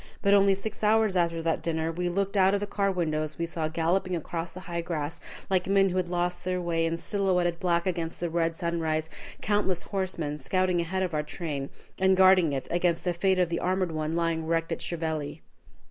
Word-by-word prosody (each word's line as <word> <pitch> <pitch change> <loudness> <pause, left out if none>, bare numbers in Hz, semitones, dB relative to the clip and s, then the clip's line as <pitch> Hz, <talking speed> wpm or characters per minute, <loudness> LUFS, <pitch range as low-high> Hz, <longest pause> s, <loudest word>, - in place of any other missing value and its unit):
But 200 - +4
only 195 -1 +5
six 215 +2 -6
hours 215 -2 +3
after 170 -2 +1
that 165 -1 0
dinner, 160 -1 -1
as - - -11
we 180 0 -1
looked 195 +3 -1
out 195 0 +4
of - - 0
the 205 - -2
car 200 -1 0
windows, 155 -4 -2
we 170 - -1
saw 165 -2 -2
galloping 170 +3 0
across 165 +1 -4
the 185 - -9
high 170 -2 -3
grass, 160 -2 -4 0.3
like 185 -2 +1
men 195 0 +4
who 185 - -2
had 180 -2 0
lost 175 0 -1
their 180 0 -1
way, 165 -2 0
and 165 0 -2
silhouetted 180 -4 +1
black 170 -2 +1
against 170 -3 -2
the 175 - -1
red 165 0 0
sunrise, 160 -2 -1 0.3
countless 200 -3 +1
horsemen 175 -7 -3
scouting 180 +5 +1
ahead 185 +3 -1
of 180 -3 -2
our 150 - +1
train, 150 -2 -4 0.3
and 190 0 +4
guarding 185 -4 +6
it 135 -2 -3
against 175 -1 +1
the 180 - 0
fate 190 +2 +2
of 180 -2 +2
the 170 - -1
armored 185 -1 0
one 155 0 -2
lying 165 -1 0
wrecked 165 0 0
at 165 - -2
Chieveley. 160 -3 -3
175 Hz, 215 wpm, -28 LUFS, 165-185 Hz, 0.3 s, guarding